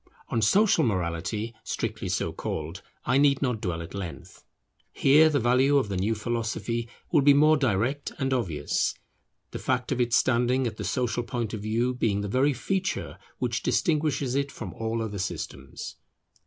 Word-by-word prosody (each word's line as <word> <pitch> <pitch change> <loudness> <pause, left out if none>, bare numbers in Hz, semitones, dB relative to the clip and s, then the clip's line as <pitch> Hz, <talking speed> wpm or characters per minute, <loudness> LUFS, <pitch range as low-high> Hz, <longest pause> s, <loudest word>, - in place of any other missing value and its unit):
On 115 - 0
social 195 - +4
morality 95 - -1
strictly - - -3
so - - -1
called, 80 +6 -5 0.2
I 130 +3 +3
need 140 -1 +4
not 125 -5 -1
dwell 85 -4 -2
at 80 - -10
length. 95 -4 -7 0.5
Here 150 +3 +5
the 145 -2 +1
value 130 +4 +4
of 130 -7 +1
the 100 - -2
new 100 +5 0
philosophy 115 +1 -2 0.2
will 155 - +5
be 140 0 +6
more 155 +2 +6
direct 130 +1 0
and 135 0 0
obvious, 85 - 0 0.6
the - - -5
fact 125 0 -1
of 125 -2 +1
its 120 -1 +3
standing 125 +1 +2
at 110 -2 -3
the - - -4
social 120 -2 0
point 115 -1 -3
of 110 - -4
view 115 +4 0
being 110 -5 0
the 100 - -3
very 130 +7 +2
feature 190 +9 -2 0.2
which - - -1
distinguishes 150 -6 +1
it 140 +1 0
from 95 -7 -7
all 115 0 -2
other 105 -3 -4
systems. 70 -7 -5
120 Hz, 170 wpm, -27 LUFS, 105-135 Hz, 0.6 s, be